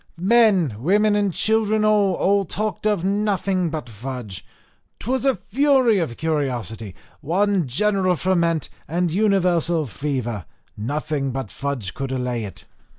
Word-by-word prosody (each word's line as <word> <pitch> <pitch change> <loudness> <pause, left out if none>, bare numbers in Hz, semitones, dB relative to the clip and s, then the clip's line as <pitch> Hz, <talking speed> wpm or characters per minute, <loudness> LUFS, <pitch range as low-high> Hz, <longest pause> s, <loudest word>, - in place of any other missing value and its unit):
Men, 190 - +3
women, 205 - +3
and 205 -2 +1
children 220 +2 +1
all, 205 -3 +3
all 200 +2 +2
talked 210 +4 -3
of 205 -4 0
nothing 195 -3 0
but 155 -5 -5
fudge. 115 -4 -7 0.5
'Twas 260 +3 -2
a 270 -2 +3
fury 250 +2 +2
of 150 -9 -3
curiosity, 120 - -2 0.2
one 190 0 +1
general 190 - +1
ferment, 170 -3 0 0.2
and 175 +2 0
universal 175 -5 +2
fever 120 - -3 0.3
nothing 140 +4 -2
but 130 -5 -4
fudge 135 -9 -4
could 135 -1 -4
allay 125 -3 -2
it. 100 - -10
170 Hz, 130 wpm, -22 LUFS, 135-205 Hz, 0.5 s, Men